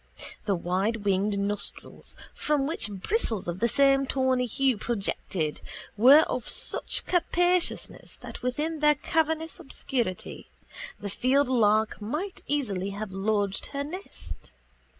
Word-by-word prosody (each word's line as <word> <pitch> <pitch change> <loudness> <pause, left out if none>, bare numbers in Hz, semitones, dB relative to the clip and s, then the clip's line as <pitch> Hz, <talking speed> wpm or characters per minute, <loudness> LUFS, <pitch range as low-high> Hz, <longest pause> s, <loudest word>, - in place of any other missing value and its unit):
The 200 - +1
widewinged 200 +2 0
nostrils, 200 +1 -3 0.2
from 295 -2 0
which 295 -7 -2
bristles 210 - -1
of 175 +1 -3
the 235 - +3
same 275 +2 +3
tawny 260 -2 +1
hue 265 +2 +2
projected, 195 -8 -1 0.3
were 260 +8 +8
of 255 -6 -2
such - - 0
capaciousness 355 0 +1
that - - -10
within 300 +6 -2
their 300 0 +5
cavernous 320 +3 -1
obscurity 245 - -3 0.5
the 205 - -5
fieldlark 235 -4 +2
might 305 - -4
easily 205 -10 -1
have 215 -2 -5
lodged 200 0 0
her 280 0 -3
nest. 285 - -8
245 Hz, 115 wpm, -27 LUFS, 205-295 Hz, 0.5 s, were